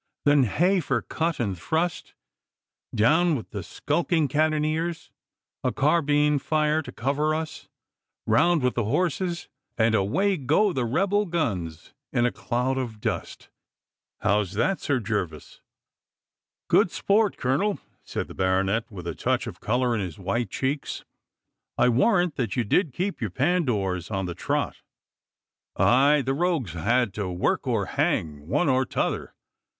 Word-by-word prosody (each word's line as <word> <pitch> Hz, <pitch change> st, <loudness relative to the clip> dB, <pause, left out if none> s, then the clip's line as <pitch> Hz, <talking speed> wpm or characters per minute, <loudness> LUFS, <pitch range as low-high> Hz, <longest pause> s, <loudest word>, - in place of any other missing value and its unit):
Then 145 Hz, -2 st, +5 dB
heh 180 Hz, -, +2 dB
for 130 Hz, -, -1 dB
cut 165 Hz, -1 st, -2 dB
and 100 Hz, -6 st, -1 dB
thrust, 160 Hz, -, -2 dB, 0.8 s
down 160 Hz, +9 st, +3 dB
with 120 Hz, -, -6 dB
the -, -, -4 dB
skulking 165 Hz, -3 st, 0 dB
cannoniers, 155 Hz, +3 st, 0 dB, 0.5 s
a -, -, +1 dB
carbine 150 Hz, -1 st, +2 dB
fire 155 Hz, +2 st, +1 dB
to -, -, -9 dB
cover 145 Hz, +5 st, 0 dB
us, 160 Hz, 0 st, -5 dB, 0.6 s
round 155 Hz, +8 st, +3 dB
with 125 Hz, -, +2 dB
the 120 Hz, -, -1 dB
horses, 175 Hz, -, -1 dB, 0.3 s
and 110 Hz, 0 st, +3 dB
away 185 Hz, -, +2 dB
go 160 Hz, +9 st, +2 dB
the 130 Hz, -3 st, 0 dB
rebel 195 Hz, -, +1 dB
guns 95 Hz, -, -3 dB, 0.2 s
in 120 Hz, -2 st, +2 dB
a 125 Hz, -, +2 dB
cloud 125 Hz, +2 st, -1 dB
of 115 Hz, -4 st, -5 dB
dust! -, -, -4 dB, 0.7 s
How's 105 Hz, -3 st, +1 dB
that, 160 Hz, -, +1 dB
Sir 140 Hz, -3 st, 0 dB
Gervas?' 100 Hz, -8 st, -4 dB, 1.1 s
'Good -, -, +4 dB
sport, 205 Hz, 0 st, +1 dB
Colonel,' 170 Hz, +12 st, 0 dB, 0.3 s
said -, -, -4 dB
the -, -, -10 dB
baronet, 95 Hz, +4 st, 0 dB
with 90 Hz, -5 st, -9 dB
a 85 Hz, -, -3 dB
touch -, -, -1 dB
of -, -, -8 dB
colour 120 Hz, +2 st, +1 dB
in 110 Hz, -, 0 dB
his 90 Hz, -5 st, -5 dB
white 115 Hz, +4 st, -2 dB
cheeks. 135 Hz, +7 st, -3 dB, 0.7 s
'I -, -, +4 dB
warrant 175 Hz, -, +2 dB
that 115 Hz, -7 st, -1 dB
you 120 Hz, -, +1 dB
did 155 Hz, -, +1 dB
keep 185 Hz, +6 st, -3 dB
your 110 Hz, -, -1 dB
Pandours 110 Hz, -, 0 dB
on 95 Hz, -3 st, -2 dB
the 90 Hz, -, -4 dB
trot.' -, -, -2 dB, 1.0 s
'Aye, 140 Hz, +4 st, +4 dB
the 135 Hz, -, +1 dB
rogues 155 Hz, -, 0 dB
had 110 Hz, +6 st, +1 dB
to 100 Hz, -3 st, -3 dB
work 90 Hz, -, 0 dB
or -, -, +1 dB
hang 75 Hz, -1 st, -1 dB
one 165 Hz, -, +1 dB
or 130 Hz, -1 st, +3 dB
t'other. -, -, -2 dB
130 Hz, 145 wpm, -25 LUFS, 110-160 Hz, 1.1 s, Then